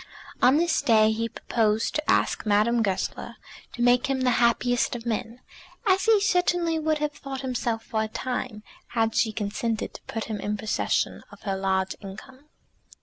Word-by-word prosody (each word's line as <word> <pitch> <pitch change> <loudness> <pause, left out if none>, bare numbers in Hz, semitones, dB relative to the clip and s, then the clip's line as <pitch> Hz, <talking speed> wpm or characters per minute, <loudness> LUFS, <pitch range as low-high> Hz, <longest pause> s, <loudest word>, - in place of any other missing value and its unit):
On 260 +4 +6
this 335 0 +2
day 220 -2 +4
he 230 +1 -2
proposed 220 -2 0
to 300 0 -2
ask - - +2
Madame 215 +3 +3
Goesler 195 -4 -2 0.4
to 240 - -2
make 245 0 +4
him 270 -1 -1
the 255 -1 +3
happiest 240 +1 +2
of 235 -1 -7
men, 230 +1 -3 0.4
as 380 -1 +3
he 445 -2 +5
certainly 355 -4 +1
would 310 0 +1
have 300 0 -1
thought 275 -2 -7
himself 240 -3 -2
for 220 -2 -2
a 220 - -1
time, 245 -1 -4 0.3
had 225 0 +2
she 220 0 +2
consented 215 +1 -3
to - - -10
put 225 0 -3
him 215 -2 -4
in 210 +1 -2
possession 215 +1 -1
of - - -15
her 195 -3 -1
large 190 0 0
income. 255 +8 -11
235 Hz, 175 wpm, -26 LUFS, 215-270 Hz, 0.4 s, On